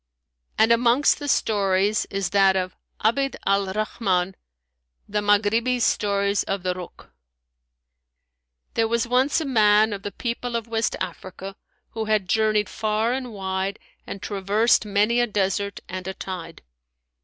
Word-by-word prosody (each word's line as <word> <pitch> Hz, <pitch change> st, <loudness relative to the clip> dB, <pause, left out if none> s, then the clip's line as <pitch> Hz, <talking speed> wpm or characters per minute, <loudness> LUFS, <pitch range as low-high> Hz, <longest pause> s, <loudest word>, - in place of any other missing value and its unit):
[FN#175] -, -, +4 dB
And 225 Hz, -, +3 dB
amongst 240 Hz, +4 st, +4 dB
the 290 Hz, -, -5 dB
stories 200 Hz, -4 st, +1 dB
is 195 Hz, -1 st, -2 dB
that 195 Hz, -1 st, +4 dB
of 185 Hz, -1 st, -2 dB, 0.3 s
ABD 275 Hz, +5 st, +1 dB
AL 200 Hz, 0 st, +2 dB
RAHMAN 195 Hz, -3 st, -1 dB, 0.7 s
THE 210 Hz, 0 st, -1 dB
MAGHRIBI'S 225 Hz, +4 st, +2 dB
STORY 200 Hz, -1 st, +1 dB
OF 195 Hz, -2 st, -2 dB
THE 180 Hz, -1 st, 0 dB
RUKH.[FN#176] 180 Hz, -1 st, -11 dB, 1.6 s
There 225 Hz, -1 st, +1 dB
was 235 Hz, +1 st, 0 dB
once 255 Hz, +5 st, +2 dB
a 320 Hz, -, -3 dB
man 215 Hz, -4 st, +4 dB
of 200 Hz, -, -6 dB
the 205 Hz, -, -5 dB
people 235 Hz, +1 st, -4 dB
of 230 Hz, -1 st, -2 dB
West 225 Hz, -1 st, -1 dB
Africa 195 Hz, +1 st, -6 dB, 0.4 s
who 225 Hz, -1 st, -3 dB
had 215 Hz, -3 st, +1 dB
journeyed 215 Hz, +1 st, +2 dB
far 220 Hz, +3 st, -1 dB
and 255 Hz, -2 st, -4 dB
wide 190 Hz, 0 st, -3 dB, 0.3 s
and 195 Hz, -, -7 dB
traversed 210 Hz, +3 st, +2 dB
many 210 Hz, +4 st, +2 dB
a 240 Hz, -, +2 dB
desert 200 Hz, -1 st, -1 dB
and 185 Hz, 0 st, -6 dB
a 190 Hz, -, -4 dB
tide. 170 Hz, -3 st, -7 dB
210 Hz, 145 wpm, -24 LUFS, 195-230 Hz, 1.6 s, FN#175